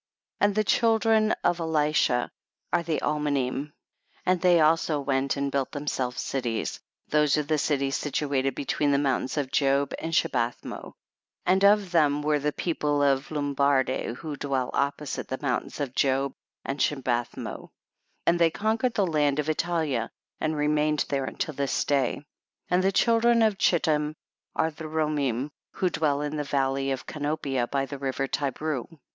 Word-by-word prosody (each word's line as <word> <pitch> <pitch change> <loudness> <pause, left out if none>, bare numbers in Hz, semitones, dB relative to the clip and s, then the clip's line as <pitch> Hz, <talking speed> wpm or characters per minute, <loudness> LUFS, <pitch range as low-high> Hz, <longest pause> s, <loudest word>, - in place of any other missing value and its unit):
15. 205 - +5
And 200 - -4
the 215 - +3
children 220 0 +3
of 175 - +2
Elishah 150 -6 +1 0.4
are - - +3
the 165 -2 -1
Almanim, 145 -2 -1 0.5
and 180 -1 +2
they 180 -2 +5
also 155 -1 +3
went 135 0 0
and 140 0 -1
built 135 -1 -1
themselves 135 -4 -2
cities; 120 -4 -2 0.3
those 150 -1 +3
are 150 - +1
the 155 +1 0
cities 140 -2 0
situate 140 -2 -1
between 145 +1 0
the 140 - +3
mountains 140 0 0
of 135 -3 -1
Job 140 0 +2
and 165 - -4
Shibathmo; 120 -6 -1 0.5
and 190 +2 +3
of 200 -2 +5
them 150 -4 +3
were 150 0 +2
the 150 +1 0
people 145 -3 0
of 135 -1 +2
Lumbardi 140 -4 0
who 155 +2 -6
dwell 135 -3 -2
opposite 140 +1 -2
the 130 - -3
mountains 125 -2 -2
of 140 -4 -3
Job 135 0 +1 0.3
and 135 +1 -3
Shibathmo, 125 -4 -2 0.6
and 170 0 +3
they 170 -1 +5
conquered 220 +6 0
the 200 - +3
land 150 -4 +1
of 150 - 0
Itaha 155 -6 -1 0.3
and 155 0 -1
remained 150 0 +1
there 135 -2 -1
unto - - -3
this 140 -1 -1
day. 140 -4 +2
16. 145 - -13 0.5
And 180 +1 +3
the 195 - +3
children 230 +2 +4
of 215 -3 +2
Chittim 155 -3 +2 0.4
are 160 - +1
the 160 +1 -9
Romim 150 -4 -1 0.2
who 185 -2 0
dwell 150 -3 0
in 150 +1 -3
the 150 - -1
valley 135 -1 0
of 135 -1 -3
Canopia 145 -4 -2
by 135 -1 0
the 140 0 -7
river 135 0 -1
Ti 140 +1 -1
breu. 150 -2 -3
145 Hz, 165 wpm, -26 LUFS, 135-160 Hz, 0.6 s, 15